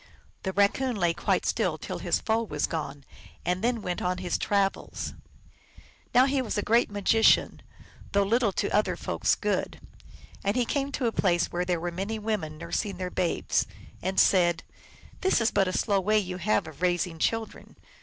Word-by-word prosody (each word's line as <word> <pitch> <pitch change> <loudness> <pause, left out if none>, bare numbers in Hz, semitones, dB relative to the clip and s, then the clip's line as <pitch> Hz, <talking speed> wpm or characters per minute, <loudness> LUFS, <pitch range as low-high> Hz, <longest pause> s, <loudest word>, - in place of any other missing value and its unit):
The 190 - -2
Raccoon 205 +6 +2
lay 175 -4 +1
quite - - 0
still - - 0
till - - -6
his - - 0
foe 220 +1 +1
was 150 -10 -1
gone, 145 -3 -5 0.4
and 180 +3 -1
then 235 -2 0
went 180 -1 -3
on 180 0 0
his 180 -2 -2
travels. 200 -1 -1 1.0
Now 250 +2 +6
he 275 0 +1
was 230 -3 -3
a 205 - 0
great 230 +2 +3
magician, 205 +2 +3 0.5
though 200 0 +3
little 225 +1 +2
to - - -1
other 210 - +2
folks - - 0
good. - - -2 0.6
And 200 +1 0
he 250 -1 +2
came 280 +2 -1
to 265 - -1
a 230 - +2
place 175 -5 +1
where 175 +1 -1
there 180 -2 0
were 175 +1 -3
many 195 +5 -3
women 205 -8 -3
nurs 170 +1 -2
ing 200 -3 -6
their 180 0 -4
babes, 175 - 0 0.3
and 190 +2 0
said, 175 -3 +4 0.3
" - - -23
This 380 -7 +3
is 230 0 +2
but 195 - +2
a - - 0
slow 200 +2 +1
way 210 +3 +2
you 185 -3 -1
have 200 -1 +1
of 160 0 -11
raising 175 -2 0
children." 225 +4 -2
195 Hz, 190 wpm, -27 LUFS, 175-220 Hz, 1.0 s, Now